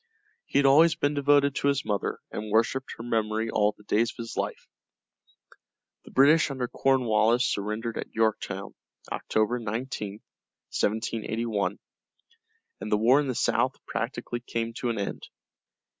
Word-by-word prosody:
He - - 0
had 140 - +4
always 160 +5 +6
been 145 +1 0
devoted 145 -1 +3
to 140 - -1
his 140 0 +1
mother 100 -2 -1
and 105 0 -5
worshipped 115 +4 +1
her 115 - -7
memory 110 -1 -1
all 105 0 +2
the 105 - -18
days 110 +3 +1
of - - -11
his 115 -1 -6
life. - - -3 1.4
The - - -12
British 150 +5 +5
under 130 -3 -3
Cornwallis 120 -3 +2
surrendered 110 +2 -2
at - - -6
Yorktown, 105 -3 -1 0.4
October 110 +3 0
19, 110 -2 -4 0.6
1781, 110 -2 -1 1.0
and 105 - -6
the 105 - +4
war 120 +6 +5
in 145 - -1
the 130 - -2
south 120 +2 +1
practically 120 0 -3
came 115 -1 -3
to 125 - -1
an 115 - -2
end. 100 - -4
115 Hz, 145 wpm, -27 LUFS, 110-130 Hz, 1.4 s, always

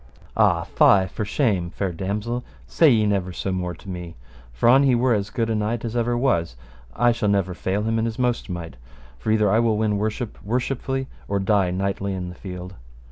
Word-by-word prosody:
Ah, - - +3
fie 95 -2 +4
for 105 +3 -4
shame, 100 - 0
fair 95 +1 -3
damosel, 105 +7 -3 0.2
say 160 - +4
ye 110 -4 +4
never 100 -3 0
so 95 +2 -3
more 90 -1 -2
to 100 - -17
me; 90 -3 -6 0.4
for, - - 0
an 130 +3 +7
he 135 -3 +4
were 125 +1 +3
as 105 -2 -1
good 115 +2 -1
a 115 - 0
knight 110 +2 -1
as 115 0 -4
ever 120 0 +1
was, 85 - +1 0.4
I 120 0 +4
shall 115 -3 0
never 100 -2 +1
fail 95 +3 -2
him 115 +1 0
in 110 - 0
his 115 -1 -3
most 125 -3 -1
might, 85 -6 -6 0.4
for - - -4
either 105 -2 +3
I 110 - +4
will 115 -2 +2
win 105 -1 +1
worship 110 +2 -3
worshipfully, 130 +4 -2 0.2
or 100 - 0
die 100 -1 +2
knightly 95 +1 -2
in 90 -1 -4
the - - -8
field. 90 -1 -8
105 Hz, 210 wpm, -23 LUFS, 95-115 Hz, 0.4 s, an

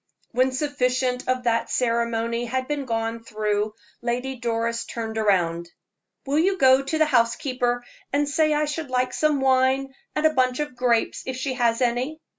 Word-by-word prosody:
When 255 +2 +2
sufficient 255 -2 -1
of 255 -1 0
that 230 -1 +1
ceremony 235 -1 0
had 260 +2 -2
been 290 -2 -2
gone 225 -1 -2
through, 215 -1 -1 0.3
Lady 250 +2 -2
Doris 230 -1 -1
turned 225 -1 -5
round: 170 -5 +1 0.6
"Will 285 +2 +1
you 380 +4 +2
go 260 -2 +6
to 275 +3 -2
the 315 - +4
housekeeper 245 -1 +1 0.3
and 290 +1 +1
say 310 +2 +2
I 300 0 +2
should 295 -1 -4
like 255 0 0
some 300 -3 +1
wine 265 +1 +2 0.2
and 305 - 0
a 310 - +4
bunch 255 -1 +1
of 295 -4 -3
grapes, 245 -2 +1
if 260 - -2
she 260 0 -2
has 235 -1 +1
any?" 250 +6 -1
255 Hz, 170 wpm, -24 LUFS, 230-275 Hz, 0.6 s, go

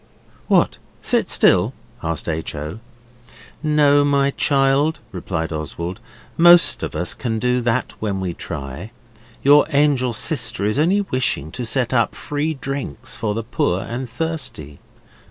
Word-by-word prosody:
'What, - - +2 0.2
sit - - +1
still?' - - +3 0.3
asked 80 -1 -3
H. 80 -1 -3
O. 75 +7 -6 0.8
'No, 145 -2 +4
my 140 -1 +2
child,' 140 +3 +2
replied 85 -3 -4
Oswald, 85 +3 -5 0.4
'most 175 +1 +6
of - - -4
us - - -1
can 115 -2 -3
do 125 +2 +1
that 120 +1 -1
when 100 -3 -2
we 90 -2 -3
try. 75 +6 -7 0.5
Your 145 +2 +6
angel 140 -4 +2
sister 120 - 0
was 105 +6 +1
only 185 +7 +3
wishing 130 - -1
to 125 - -5
set 125 +2 0
up 115 -3 +1
free 150 +2 -2
drinks 135 -2 -5
for 110 -2 -2
the 115 - -3
poor 95 -5 -1
and 120 +1 -5
thirsty. 125 - -4
125 Hz, 140 wpm, -20 LUFS, 95-145 Hz, 0.8 s, most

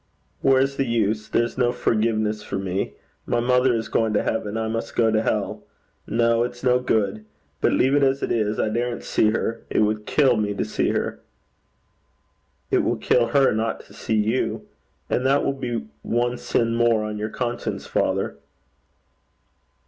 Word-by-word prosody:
'Where's 135 0 +3
the 135 - +1
use? 110 -2 0
There's 120 +2 0
no 120 -1 +3
forgiveness 110 -2 0
for 100 - -4
me. 95 0 -2 0.3
My - - +1
mother 125 +1 +3
is 115 -1 -2
going 110 -1 +1
to 105 - +2
heaven. 110 -1 -2
I 110 0 -1
must 115 +1 -4
go 115 -2 +3
to 110 0 +2
hell. - - -2 0.4
No. 115 +1 +2
It's 120 0 -6
no 125 -1 +4
good. 110 -4 0 0.4
Better - - +3
leave 130 +2 +3
it 145 - +4
as 135 0 +2
it - - -1
is. 110 -2 0
I - - +1
daren't 120 +2 -2
see 110 - +2
her. 115 +1 -2
It - - +1
would 105 0 0
kill 135 -6 +3
me 105 -1 -1
to - - -1
see - - 0
her.' - - -2 1.5
'It - - +4
will - - 0
kill 120 -1 +2
her 135 +2 +3
not 110 +1 -1
to - - -18
see 110 - -2
you; 110 +4 0 0.4
and 125 - 0
that 135 +2 +2
will 140 - +1
be 120 - -4
one 120 +4 -1
sin 115 0 0
more 115 -2 +3
on 105 0 -4
your 105 +1 -2
conscience, 120 +1 -3
father.' - - -1
115 Hz, 180 wpm, -23 LUFS, 110-125 Hz, 1.5 s, no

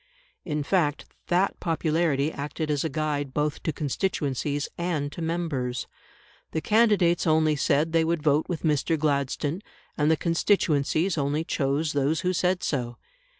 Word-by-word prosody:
In 150 -2 -2
fact, 150 -3 +1 0.2
that 180 +3 +1
popularity 160 -3 +1
acted 150 +2 -4
as 145 -2 0
a 160 - -1
guide 145 -4 -2
both 150 0 -1
to 160 - -1
constituencies 145 -2 -2
and 160 -5 -2
to 170 - -7
members. 160 -7 -2 0.7
The 160 - 0
candidates 210 -6 +3
only 155 -1 +3
said 150 +2 +1
they 165 0 +3
would 165 -1 -1
vote 150 0 +2
with 170 -3 -3
Mr. 155 +1 +1
Gladstone, 145 +3 -1 0.3
and 150 0 +2
the 160 - +3
constituencies 165 -1 +1
only 145 +3 0
chose 145 0 -1
those 145 +3 +1
who 180 0 0
said 180 +1 +1
so. 120 -4 -2
155 Hz, 150 wpm, -26 LUFS, 145-170 Hz, 0.7 s, candidates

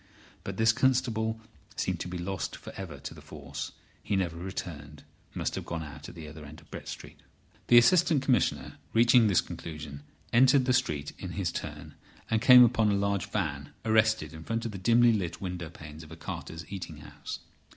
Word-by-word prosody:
But 100 -1 -5
this 110 0 +4
constable 110 -3 +1 0.4
seemed - - -1
to - - -4
be 90 0 -5
lost 95 +1 -3
for - - -10
ever 90 -7 -7
to 70 - -7
the - - -13
force. - - -7 0.3
He 100 - -1
never 90 -4 0
returned: 85 -5 -7 0.3
must - - -1
have - - -4
gone 85 -1 -4
out 75 -2 -9
at - - -12
the 80 -2 -8
other 75 0 -10
end 75 +2 -11
of 80 -2 -22
Brett - - -8
Street. - - -8 0.5
The 120 - +7
Assistant 155 +3 +5
Commissioner, 125 -9 +1
reaching 115 0 +6
this 100 -4 +4
conclusion, 75 -3 -8 0.3
entered 130 +2 +6
the 130 - +3
street 75 -11 0
in - - -6
his - - -1
turn, - - -6 0.4
and 110 -1 +2
came 125 -1 +10
upon 115 -3 +3
a 100 - +2
large 100 -2 0
van 70 -8 -3
arrested 110 -2 +3
in 80 0 -9
front 115 +5 -2
of 115 - -2
the 95 - -7
dimly 115 +4 +5
lit 90 -6 -2
window 90 -3 -5
panes 75 0 -11
of 80 -1 -13
a - - -7
carter's 80 0 -7
eating 85 -6 -6
house. 75 - -8
95 Hz, 195 wpm, -29 LUFS, 80-115 Hz, 0.5 s, came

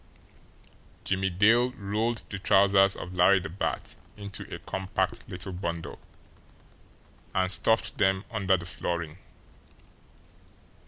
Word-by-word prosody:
Jimmie 95 0 0
Dale 115 +7 +4
rolled 110 +2 -2
the 100 - -5
trousers 100 0 +4
of 90 - -7
Larry 90 +2 +5
the 90 - -6
Bat 90 +5 -4 0.2
into 100 -1 -7
a - - -4
compact 95 0 -3
little 95 +1 -6
bundle, 85 -2 -4 1.4
and 95 0 +2
stuffed 110 +3 +1
them 95 +1 +2
under 95 -4 +2
the 85 - -8
flooring. 85 -1 -4
95 Hz, 110 wpm, -28 LUFS, 90-100 Hz, 1.4 s, Larry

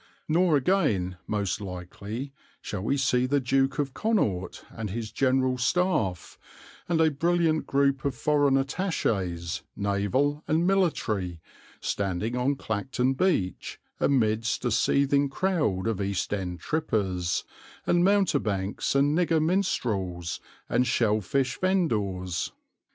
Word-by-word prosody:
Nor 165 -1 +3
again, 125 - +1
most 105 -1 -1
likely, 100 +8 -6 0.3
shall 105 - -5
we 135 +8 0
see 125 -2 +2
the 140 +2 +2
Duke 135 +1 +1
of 140 -3 -1
Connaught 110 - -1
and 110 -2 -5
his 110 +2 -4
General 130 -1 +1
Staff, 125 - 0 0.5
and 170 -2 +2
a 160 -1 +4
brilliant 165 +1 +1
group 140 -1 +2
of 140 -2 -1
foreign 145 +1 +2
attachés, 105 - -1
naval 100 - 0
and 160 +3 +2
military, 110 - 0 0.4
standing 100 +4 -2
on 130 +3 +1
Clacton 125 +2 -1
beach 135 - -1 0.2
amidst 115 -2 +1
a 120 - +1
seething 140 +4 +2
crowd 145 - 0
of 110 -3 -1
East 100 0 -1
End 90 -3 -3
trippers, 95 - -1 0.4
and 175 0 +3
mountebanks, 140 - +1
and 145 +2 +3
nigger 165 -2 +2
minstrels, 105 - -1 0.3
and 125 +1 +1
shell 110 -3 +2
fish 130 +5 -1
vendors. 105 - 0
130 Hz, 120 wpm, -27 LUFS, 100-150 Hz, 0.5 s, a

